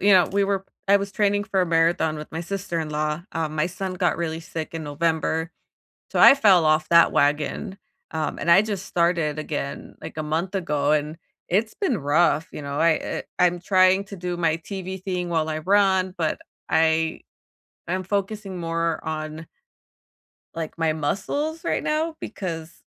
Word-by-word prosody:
you 205 0 +5
know, 180 -3 +6
we 200 0 +2
were 195 -1 -1 0.2
I 200 - +7
was 200 0 -4
training 205 -1 +1
for 195 -1 0
a 180 - +2
marathon 165 -1 +2
with 150 - -8
my 165 - -4
sister-in-law, 165 -4 -3
uh, 160 -1 -1
my 155 +1 -1
son 185 +1 -5
got 180 -1 +1
really 165 -1 -2
sick 165 -1 -6
in 160 -1 -5
November, 160 +2 -1 0.6
so - - -1
I - - +10
fell 195 -10 +5
off 155 0 +3
that 170 0 +6
wagon, 150 +6 0 0.3
um, 160 -1 -2
and 170 - -2
I 170 +4 +8
just 205 -3 -4
started 170 -3 +1
again, 145 -2 -5
like, - - -8
a 155 - -2
month 165 +6 -2
ago, 150 -5 +1
and 150 +2 -1 0.3
it's 215 +5 +1
been 300 - 0
rough, 155 +2 +2
you - - -6
know? 140 0 -4
I 165 0 +5
eh, - - -4 0.2
I'm 175 -1 +3
trying 185 +2 +4
to 200 - -9
do 180 -1 -4
my 165 -2 +2
TV 190 +1 -7
thing 180 -2 -2
while 160 -2 0
I 155 - -2
run, 190 0 +2
but 160 -2 -1 0.3
I 160 0 +2 0.7
I'm 185 +2 -1
focusing 200 -1 -3
more 165 -1 -1
on 155 0 -5 1.1
like, 165 0 -5
my 160 -1 +2
muscles 285 - -2
right - - 0
now 315 +1 -1
because 165 -6 -6
170 Hz, 175 wpm, -24 LUFS, 160-190 Hz, 1.1 s, I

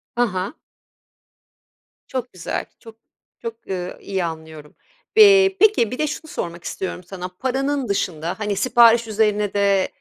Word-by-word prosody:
Ha 240 - +3
ha. 185 +6 -3 1.5
Çok 255 -2 -5
güzel. 180 -2 -4
Çok 225 -1 -14 0.5
çok, 230 -1 -4 0.2
ııı, 180 -2 -4
iyi 190 -2 -2
anlıyorum. 160 -2 -8 0.4
Bi 390 -2 +7
peki, 410 - +4
bir 250 - -4
de 305 - +1
şunu 310 +2 -6
sormak 170 0 -5
istiyorum 185 -1 -5
sana. 180 0 -7
Paranın 270 +1 -1
dışında, 175 -2 -2
hani, 210 -1 -1
sipariş 235 +1 +5
üzerine 210 -1 +1
de 200 -2 +2
210 Hz, 140 wpm, -21 LUFS, 185-255 Hz, 1.5 s, Bi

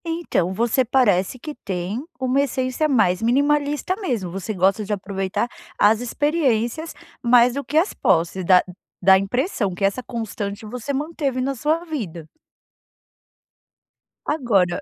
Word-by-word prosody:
Então, 325 - -1
você 235 +5 +2
parece 230 -4 +2
que 300 +4 -7
tem 195 +1 -4 0.2
uma 260 +1 +2
essência 260 +2 -1
mais 215 -8 +2
minimalista 290 +7 +1
mesmo, 225 - -2
você 195 +3 -4
gosta 195 +2 +2
de 205 - -6
aproveitar 195 +1 -2 0.3
as 215 +1 +5
experiências 285 +1 0 0.3
mais 240 0 +5
do 280 +2 -3
que 300 - -2
as 345 +6 +2
posses, 180 +1 +1
dá 180 +1 +5 0.4
dá 190 +1 +7
impressão 205 - -1
que 175 - -6
essa 200 +6 +1
constante 215 -4 -5
você 250 +5 -5
manteve 280 -2 -2
na 270 +2 -1
sua 310 +7 0
vida. 190 - -5 2.0
Agora, 210 - +1
235 Hz, 135 wpm, -22 LUFS, 195-280 Hz, 2.0 s, dá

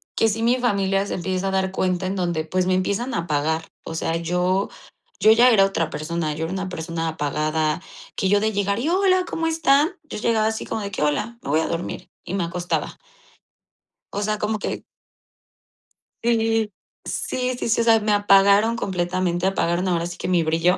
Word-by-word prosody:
que 225 - +3
si 225 +2 -2
mi 240 +2 +3
familia 195 -5 +1
se - - -3
empieza 185 +2 -2
a - - -2
dar 190 0 0
cuenta, 185 -1 -1
en 190 - -2
donde, 175 -4 -1
pues, 185 +3 0
me 185 - +1
empiezan 200 +7 -1
a - - 0
apagar. 160 0 -1 0.2
O 165 - -6
sea, 165 0 -1
yo 180 +3 0 0.5
yo 215 - +6
ya 240 +3 +6
era 205 -4 +6
otra 170 -5 -1
persona, 155 0 -3
yo 160 - -4
era 165 - -5
una 190 0 -3
persona 165 -1 -4
apagada 155 +1 -1 0.4
que 195 - +1
yo 205 +1 +3
de 220 +1 +1
llegar: 200 0 0
"Y 280 +7 -1
hola, 370 0 +3
¿cómo 325 -1 -2
están?" 315 -1 +3
Yo 305 - -7
llegaba 220 0 +1
así 220 0 -3
como 220 - -3
de 200 - -5
que: 185 - -4
"Hola, 180 +11 0
me - - -7
voy 155 +3 +3
a - - -1
dormir". 170 +1 -4 0.2
Y 180 - -5
me 195 -2 0
acostaba. 175 +1 -3 1.2
O 205 - -2
sea, 215 +1 0
como 215 +1 -1
que - - -4 1.4
Sí, 225 -2 +1 0.3
sí, 255 0 -2
sí, - - -3
sí, 230 0 +2
o - - +2
sea, 225 -1 +5
me 210 0 0
apagaron 205 +2 +5
completamente, 180 -3 -1
apagaron 180 -1 0
ahora 170 -2 0
sí 175 0 -6
que - - -4
mi 180 -2 +2
brillo. 165 +3 +2
190 Hz, 200 wpm, -23 LUFS, 170-220 Hz, 1.4 s, yo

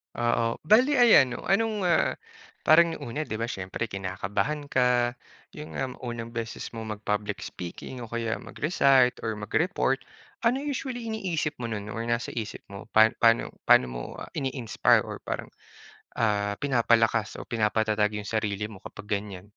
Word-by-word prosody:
Oo, 120 -1 +1
bale 250 - +5
ayan 210 - +6
'no, - - -8
anong, 210 +1 +1
ah, 175 -2 +2 0.5
parang 165 +1 +5
nung 120 - -7
una 155 +5 -3
di 110 - -3
ba 115 - -3
siyempre 95 +3 -4
kinakabahan 100 +10 -2
ka, 125 -1 +3 0.4
yun 150 - -9
nga 130 -1 -2
unang 120 -2 -5
beses 115 -1 -5
mo 115 -1 -6
mag-public 105 -1 -3
speaking 90 +8 -7
o 120 - -7
kaya 115 0 -2
mag-recite 135 -5 +2
or 110 -1 -2
mag-report. 135 - 0 0.5
Ano 255 +3 +1
usually 255 -4 -4
iniisip 180 -8 -2
mo 120 - -3
nun 105 -2 -5
or 115 - -4
nasa 120 +1 -1
isip 110 -3 -5
mo 100 - -8
pa 110 +1 +7
paano 115 0 +4 0.2
paano 65 - +7
mo, - - -5
ah, - - -9
ini-inspire 130 -5 +1
or - - -7
parang, - - -5 0.7
ah, 105 -2 +1
pinapalakas 115 -5 +2
o - - -7
pinapatatag 110 -1 +1
yung 105 - -7
sarili 105 -1 -1
mo 105 -3 -12
kapag 105 - -10
ganyan? 100 -3 -3
115 Hz, 160 wpm, -27 LUFS, 105-145 Hz, 0.7 s, pa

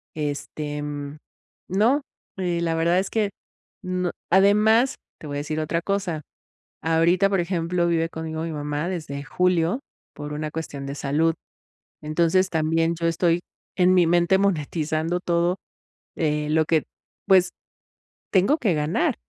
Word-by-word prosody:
Este, 150 0 -4
mm, 145 0 -5 0.5
no, 225 +10 +3 0.4
y 175 -2 -1
la 165 -1 0
verdad 170 +2 +3
es 190 - -2
que, 210 -3 0 0.5
no 185 -1 -1 0.2
además, 210 +7 +5 0.2
te 155 - -9
voy 145 0 -4
a - - -1
decir 155 +1 -3
otra 160 +2 -1
cosa, 185 -4 -2 0.6
ahorita, 170 +4 +3
por 195 - +1
ejemplo, 170 0 0
vive 165 -1 +1
conmigo 160 -1 -5
mi 165 - -3
mamá 150 +2 -3
desde 155 -6 -4
julio 180 - +1 0.3
por 145 0 -6
una 150 +1 -3
cuestión 145 -3 -5
de 140 - -4
salud. 155 +4 +1 0.7
Entonces, 170 +5 +2
también 165 +1 +1
yo 170 - +1
estoy 170 +1 +2 0.4
en 180 0 +4
mi 180 -2 +5
mente 175 +2 +3
monetizando 165 -2 0
todo, 175 0 +1 0.6
eh, 150 -1 0
lo 160 +1 +3
que 160 -1 +2 0.4
pues, 185 -2 +5 0.8
tengo 200 +10 +4
que 215 - +1
ganar 150 +1 +1
165 Hz, 145 wpm, -24 LUFS, 155-185 Hz, 0.8 s, además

